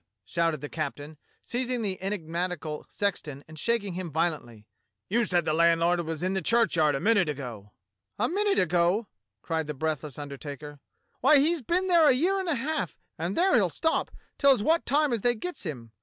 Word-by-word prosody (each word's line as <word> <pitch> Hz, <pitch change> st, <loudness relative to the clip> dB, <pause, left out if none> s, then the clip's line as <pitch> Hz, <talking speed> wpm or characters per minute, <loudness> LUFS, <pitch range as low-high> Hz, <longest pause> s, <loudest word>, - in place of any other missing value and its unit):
shouted 165 Hz, -, 0 dB
the 145 Hz, -, -4 dB
captain, 150 Hz, 0 st, -5 dB, 0.3 s
seizing 245 Hz, -1 st, -2 dB
the 190 Hz, -3 st, -3 dB
enigmatical 175 Hz, -4 st, -3 dB
sexton 155 Hz, -9 st, -3 dB
and 155 Hz, -1 st, -11 dB
shaking 210 Hz, -1 st, 0 dB
him 180 Hz, -1 st, -4 dB
violently; 150 Hz, -9 st, -2 dB, 0.4 s
"you 235 Hz, +3 st, +2 dB
said 175 Hz, -4 st, +1 dB
the 155 Hz, -, +1 dB
landlord 170 Hz, +1 st, +3 dB
was 165 Hz, -1 st, -4 dB
in 185 Hz, +1 st, 0 dB
the 190 Hz, -, 0 dB
churchyard 165 Hz, -8 st, +3 dB
a -, -, -1 dB
minute 205 Hz, -4 st, +3 dB
ago." 120 Hz, -8 st, -6 dB, 0.5 s
"A -, -, +1 dB
minute 405 Hz, +2 st, +1 dB
ago!" 180 Hz, +5 st, +2 dB, 0.4 s
cried 160 Hz, -2 st, -2 dB
the 150 Hz, -, -4 dB
breathless 150 Hz, -1 st, -3 dB
undertaker. 145 Hz, 0 st, -8 dB, 0.4 s
"Why, 305 Hz, -, +6 dB
he's 315 Hz, +3 st, +2 dB
been 350 Hz, +9 st, 0 dB
there 340 Hz, -5 st, +5 dB
a -, -, +6 dB
year 360 Hz, +9 st, +1 dB
and 375 Hz, -2 st, -2 dB
a 315 Hz, -, +2 dB
half, 275 Hz, -, -2 dB, 0.2 s
and 170 Hz, +4 st, -2 dB
there 375 Hz, +2 st, +3 dB
he'll 200 Hz, -7 st, +4 dB
stop 320 Hz, -, 0 dB, 0.3 s
till 280 Hz, -, +5 dB
as 255 Hz, -7 st, +4 dB
wot 325 Hz, +6 st, +2 dB
time 290 Hz, 0 st, +2 dB
as 230 Hz, -, -1 dB
they 240 Hz, +2 st, +2 dB
gets 270 Hz, -, -5 dB
him. 120 Hz, -7 st, -7 dB
180 Hz, 185 wpm, -27 LUFS, 155-245 Hz, 0.5 s, Why